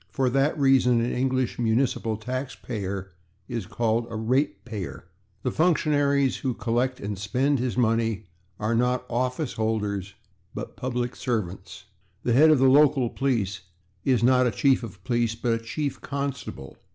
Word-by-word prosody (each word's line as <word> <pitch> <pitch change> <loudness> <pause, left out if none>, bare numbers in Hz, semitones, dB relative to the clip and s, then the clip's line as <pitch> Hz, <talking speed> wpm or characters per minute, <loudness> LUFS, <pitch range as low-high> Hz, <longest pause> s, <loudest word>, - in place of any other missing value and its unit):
For 130 -2 0
that 135 +4 +2
reason 135 -4 +4
an 115 +1 0
English 130 -1 0
municipal 115 -1 +1
taxpayer 110 -6 -5 0.4
is 115 -6 -4
called 115 +1 0
a 115 - -7
/ratepayer/. 115 - -2 0.4
The 125 - 0
functionaries 145 -4 +2
who 130 -3 -2
collect 120 +3 -1
and 100 -1 -4
spend 130 +7 +1
his 125 0 -2
money 115 -3 +1 0.3
are 110 +2 0
not 125 +2 +1
/office 125 +4 -1
holders/ 105 -3 -2 0.4
but - - -6
/public 125 -1 -3
servants/. 100 -6 -4 0.4
The 120 - +1
head 150 +6 +7
of 155 - +6
the 135 +1 +4
local 135 -3 +4
police 105 -8 -1 0.4
is 125 -4 +2
not 125 0 +5
a - - +3
/chief 130 +4 +2
of 115 -4 -9
police/, 120 -3 0
but 115 0 0
a - - +1
/chief 140 +5 -3
constable 140 - -5
125 Hz, 150 wpm, -26 LUFS, 110-135 Hz, 0.4 s, head